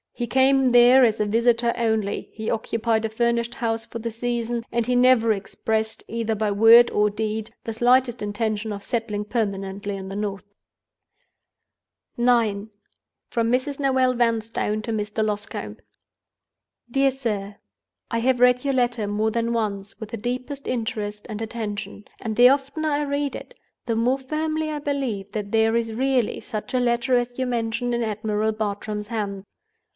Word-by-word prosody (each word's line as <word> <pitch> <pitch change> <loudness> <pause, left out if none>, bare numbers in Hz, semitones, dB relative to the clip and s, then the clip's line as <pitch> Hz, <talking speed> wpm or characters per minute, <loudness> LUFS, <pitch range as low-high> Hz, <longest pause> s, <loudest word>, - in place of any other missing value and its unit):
He 240 - -2
came 265 +1 +4
there 245 +2 +7
as 225 -3 +3
a 210 - +2
visitor 235 +2 +2
only; 220 -3 -1
he 220 0 -4
occupied 225 0 0
a - - -1
furnished 235 +1 0
house 225 -1 -2
for 230 - -6
the 230 0 -4
season; 235 0 -2
and 235 -1 0
he 250 +1 +1
never 245 -2 +5
expressed, 220 +2 -2
either 225 -1 -2
by 210 0 0
word 225 +4 +7
or 210 0 +3
deed, 215 +1 -3
the 225 - -4
slightest 245 +1 +3
intention 210 +1 -2
of 200 -1 -6
settling 215 -3 -2
permanently 200 -2 -3
in 190 0 -7
the 195 - -6
North." 200 -1 -3 1.7
IX. 230 -4 +2 0.6
From 230 -1 0
Mrs. 265 +3 0
Noel 260 -2 +2
Vanstone 225 -2 0
to 230 - -3
Mr. 215 0 -1
Loscombe. 205 - -4 1.1
"DEAR 270 +2 +3
SIR, 210 -6 -3 0.6
"I 230 - 0
have 250 +1 +2
read 250 0 +4
your 275 -1 0
letter 240 -4 0
more 210 +2 0
than 235 +1 -1
once, 205 -3 -3
with 220 -3 -7
the 230 - -5
deepest 255 +5 -4
interest 210 -3 -3
and 215 0 -5
attention; 215 -2 -5
and 220 -2 -4
the 245 +2 +8
oftener 280 +3 0
I 290 0 +1
read 285 0 -2
it, - - -10 0.3
the 230 - 0
more 245 +4 +1
firmly 310 +3 -2
I 300 -1 -3
believe 265 -9 -3
that 205 -2 -4
there 225 0 +3
is 230 -1 0
really 255 -1 +1
such 215 +3 -5
a - - +3
Letter 245 +1 +2
as 245 0 -2
you 260 - 0
mention 240 0 -1
in 235 0 0
Admiral 215 0 -1
Bartram's 210 0 -3
hands. 205 -4 -4
230 Hz, 165 wpm, -24 LUFS, 215-245 Hz, 1.7 s, the